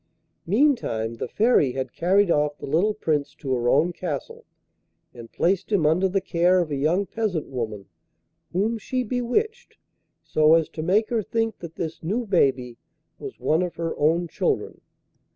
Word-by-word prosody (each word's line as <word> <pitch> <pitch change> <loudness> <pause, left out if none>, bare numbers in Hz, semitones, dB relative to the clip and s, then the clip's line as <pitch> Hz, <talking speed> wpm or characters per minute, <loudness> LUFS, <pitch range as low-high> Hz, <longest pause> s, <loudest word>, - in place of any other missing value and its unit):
Meantime 195 - +1
the - - -4
Fairy 205 - +2
had 130 -2 -4
carried 190 +2 +2
off 150 -1 +1
the - - -8
little 190 +9 +1
Prince 150 -8 -1
to 135 -2 -3
her 120 -1 0
own 160 +7 +3
castle, 155 -6 -6 0.7
and 115 -2 -11
placed 190 +4 0
him 190 -7 +2
under 175 +5 +3
the 195 +2 +1
care 180 0 +2
of 170 -4 -1
a - - 0
young 160 +8 +1
peasant 200 -8 -2
woman, 110 -6 -5 0.7
whom 220 +5 0
she 255 +4 -2
bewitched 255 - -2 0.5
so 155 +1 +4
as 165 -2 +1
to 155 - -6
make 200 +8 +1
her 230 -2 +1
think 225 +1 -2
that 170 -1 -9
this 160 -1 -5
new 215 +9 -2
baby 130 - +1 0.4
was 410 -2 -8
one 160 +3 +1
of 180 -1 -3
her 165 -1 -3
own 165 +4 +1
children. - - -2
170 Hz, 170 wpm, -24 LUFS, 150-210 Hz, 0.7 s, so